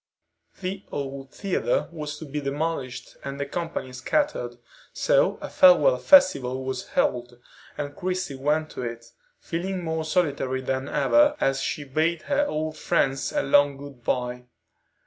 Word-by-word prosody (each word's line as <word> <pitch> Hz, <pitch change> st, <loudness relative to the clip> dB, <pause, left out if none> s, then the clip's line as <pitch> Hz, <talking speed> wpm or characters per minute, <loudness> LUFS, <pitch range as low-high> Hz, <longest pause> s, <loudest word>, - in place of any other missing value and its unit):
The 190 Hz, +1 st, -4 dB
old 135 Hz, -1 st, -5 dB
theatre 350 Hz, -, -1 dB
was 150 Hz, -2 st, -5 dB
to 160 Hz, -, -8 dB
be 150 Hz, +1 st, -4 dB
demolished 140 Hz, -2 st, -3 dB
and 140 Hz, 0 st, -5 dB
the 140 Hz, -, -1 dB
company 165 Hz, -4 st, -4 dB
scattered, 295 Hz, -, -1 dB, 0.4 s
so -, -, +2 dB
a -, -, -4 dB
farewell 280 Hz, -, +6 dB
festival 135 Hz, -, +5 dB
was 130 Hz, -1 st, -4 dB
held, 120 Hz, 0 st, 0 dB, 0.4 s
and 145 Hz, 0 st, -4 dB
Christie 185 Hz, -4 st, -2 dB
went 150 Hz, +3 st, 0 dB
to -, -, -6 dB
it, 115 Hz, -1 st, -5 dB, 0.3 s
feeling 180 Hz, +2 st, -3 dB
more 160 Hz, -1 st, -2 dB
solitary 145 Hz, -6 st, 0 dB
than 130 Hz, +1 st, -2 dB
ever 295 Hz, 0 st, +4 dB
as 135 Hz, 0 st, +1 dB
she 150 Hz, -, -2 dB
bade 155 Hz, +4 st, 0 dB
her 290 Hz, 0 st, +1 dB
old 155 Hz, 0 st, -3 dB
friends 135 Hz, 0 st, +1 dB
a -, -, 0 dB
long 145 Hz, 0 st, +4 dB
good 140 Hz, -3 st, -11 dB
bye. 125 Hz, 0 st, -2 dB
145 Hz, 145 wpm, -25 LUFS, 135-180 Hz, 0.4 s, farewell